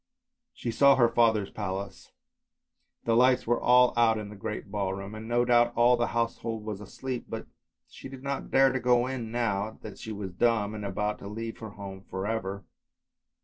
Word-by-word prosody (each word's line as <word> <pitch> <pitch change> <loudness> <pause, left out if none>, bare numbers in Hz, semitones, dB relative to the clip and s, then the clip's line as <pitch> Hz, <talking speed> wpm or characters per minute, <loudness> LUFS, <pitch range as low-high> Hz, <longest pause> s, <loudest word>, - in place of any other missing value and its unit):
She 115 - -4
saw 140 +3 +6
her 120 -3 +5
father's 110 -4 +2
palace, 95 +1 -5 0.9
the 115 - +2
lights 125 +1 +4
were 120 +1 +1
all 125 0 +5
out 115 -1 +4
in 105 -1 -5
the 105 - -10
great 105 0 -6
ballroom, 100 0 -3
and 110 +1 -8
no 120 +1 +2
doubt 120 -1 +4
all 120 +1 +5
the 120 0 0
household 115 -1 -2
was 105 -2 -5
asleep, 125 +5 -5
but - - -5 0.4
she - - -11
did 135 -1 -10
not 140 -1 -3
dare 135 0 +5
to 130 - -1
go 125 -1 +3
in 125 -4 -4
now 110 -3 -1
that - - -9
she 110 - -7
was 100 -3 -5
dumb 110 +1 +1
and 105 -1 -6
about 105 +2 -2
to - - -8
leave 115 +2 -6
her 110 - -7
home 100 -2 -9
for 95 +1 -4
ever. 100 -3 -3
115 Hz, 190 wpm, -28 LUFS, 100-120 Hz, 0.9 s, saw